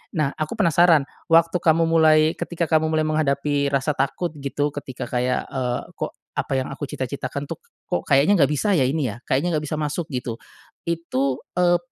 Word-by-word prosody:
Nah, 150 -3 +1
aku 155 +6 -4
penasaran, 170 -5 +4 0.2
waktu 165 +2 +4
kamu 165 0 +3
mulai 160 -1 +6 0.2
ketika 170 -1 -2
kamu 160 0 +3
mulai 155 0 +1
menghadapi 145 -2 +1
rasa 140 +1 +1
takut 145 +5 -1
gitu, 145 +1 -1
ketika 130 -3 -7
kayak, 125 0 0
eee, 125 -2 -1
"Kok - - -4 0.3
apa - - -1
yang 130 0 -1
aku 145 +2 -5
cita-citakan 140 +1 -5
tuh, - - -4 0.3
kok - - -1
kayaknya 145 +8 +4
nggak 145 -1 +4
bisa 150 +8 0
ya 130 - +3
ini 135 -2 0
ya, 105 - -7
kayaknya 160 +6 0
nggak 150 - -3
bisa 155 - -2
masuk 155 +2 -3
gitu," 125 -3 -3 0.5
itu, 140 -6 -1 0.2
eee, 175 0 +4
150 Hz, 180 wpm, -23 LUFS, 135-165 Hz, 0.5 s, mulai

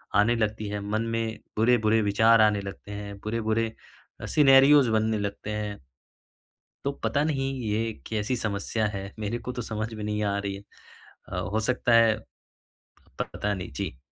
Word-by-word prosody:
आने 105 +4 +4
लगती 110 -1 -1
है, 105 0 -3
मन 105 +2 -1
में 115 -1 -2 0.2
बुरे-बुरे 110 -1 +3
विचार 110 +2 +5
आने 105 -1 +4
लगते 100 +1 -8
हैं, 100 -1 -6
बुरे-बुरे 110 0 0 0.5
अ - - -5
सिनेरियोस 140 -1 +6
बनने 110 -1 +1
लगते 100 0 -4
हैं। 105 -1 -3 1.1
तो 140 - 0
पता 115 +6 +1
नहीं 135 -3 0 0.2
ये 110 +2 0 0.2
कैसी 110 +3 -1
समस्या 110 0 -1
है, 100 0 -5
मेरे 105 +2 -2
को 125 - -5
तो 125 - -5
समझ 110 0 -4
में 110 -1 -6
नहीं 105 0 -1
आ 100 -1 0
रही 100 -1 -3
है। 100 - -9 0.7
अ, - - -2
हो 105 +5 -1
सकता 125 +1 +1
है 115 -2 +6 1.1
पता 105 0 -2
नहीं, 90 -2 -6
जी। 65 -2 -5
110 Hz, 165 wpm, -27 LUFS, 105-115 Hz, 1.1 s, सिनेरियोस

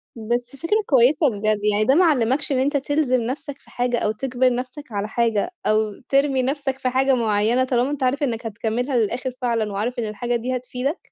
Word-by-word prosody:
بس 240 +3 -3
فكرة 375 +10 0
كويسة 270 +2 +4
بجد، 215 0 0
يعني 205 +1 +2
ده 265 +6 +3
ما 360 - +5
علّمكش 280 -1 +1
إن 260 - +2
أنت 285 +2 +1
تلزِم 275 -3 +1
نفسك 270 +4 -5
في - - -23
حاجة، 245 0 -1
أو 215 - 0
تجبر 255 +2 0
نفسك 255 +2 -7
على 205 0 -2
حاجة، 230 - 0
أو 215 -1 +1
ترمي 275 -1 +2
نفسك 275 0 -2
في 255 - 0
حاجة 265 +1 +2
معينة 225 +2 +2
طالما 255 0 +1
أنت 290 -2 -3
عارف 280 +4 +1
إنك 235 -3 -2
هتكملها 230 +4 -2
للآخر 240 +3 -1
فعلًا 230 -4 0
وعارف 235 +6 -2
إن 225 - -2
الحاجة 240 +3 -2
دي 250 +2 -2
هتفيدك؟ 255 +5 -3
250 Hz, 200 wpm, -22 LUFS, 225-270 Hz, -, ما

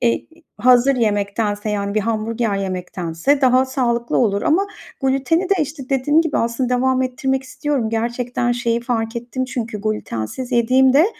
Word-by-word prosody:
eee, 235 -1 +1 0.3
hazır 250 +3 +5
yemektense, 205 -1 0
yani, 200 -1 -2
bir 215 - +2
hamburger 220 0 -1
yemektense 185 - -1
daha 255 0 +4
sağlıklı 240 -3 -1
olur. 205 -4 +1
Ama 345 +6 +2 0.4
glüteni 270 +6 +2
de, 395 - +6
işte, 285 -3 -7
dediğim 290 +4 +3
gibi 320 -3 0
aslında 235 +2 -1
devam 260 +1 +2
ettirmek 265 +1 -1
istiyorum. 260 -3 -2
Gerçekten 240 +1 -1
şeyi 235 -1 0
fark 230 -1 -2
ettim 245 +2 -3
çünkü 225 -5 -4
glütensiz 215 - -4
yediğimde, 260 - +4
240 Hz, 145 wpm, -20 LUFS, 220-260 Hz, 0.4 s, de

